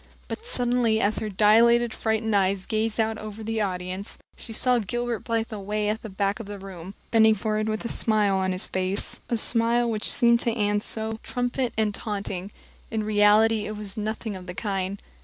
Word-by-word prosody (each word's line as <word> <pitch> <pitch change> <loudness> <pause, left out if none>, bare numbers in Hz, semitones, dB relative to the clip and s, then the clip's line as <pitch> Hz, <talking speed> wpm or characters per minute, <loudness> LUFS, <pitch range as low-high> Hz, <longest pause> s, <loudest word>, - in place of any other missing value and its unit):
But 460 - -7
suddenly, 245 - +1
as 210 0 +1
her 215 - -3
dilated, 225 +4 +4
frightened 220 -1 0
eyes 195 -1 +1
gazed 220 +1 -1
out 220 0 0
over 215 0 -7
the 225 0 -2
audience, 185 0 -4 0.2
she - - -10
saw 245 +2 +2
Gilbert 240 +2 -2
Blythe 230 0 -1
away 210 +1 -2
at 220 +1 -2
the 220 - -7
back 200 +2 -1
of 225 - -7
the 205 0 -6
room, 190 -1 -9 0.2
bending 220 -1 +5
forward 215 +1 -1
with 215 +2 -3
a - - 0
smile 210 -4 +2
on 190 0 0
his 185 0 -1
face 185 +1 -3
a 235 - +1
smile 235 +1 +4
which 215 -1 +3
seemed 235 -1 +4
to 235 -1 0
Anne 205 -2 +1
at 205 - -3
once 220 0 -3
triumphant 245 0 -2
and 215 -2 +1
taunting. 200 -3 -4 0.4
In 220 -1 -2
reality 210 +1 +4
it 215 0 -5
was 205 -2 -6
nothing 215 0 -3
of 185 -1 -9
the 180 - -6
kind. 195 0 -3
215 Hz, 195 wpm, -25 LUFS, 200-225 Hz, 0.4 s, bending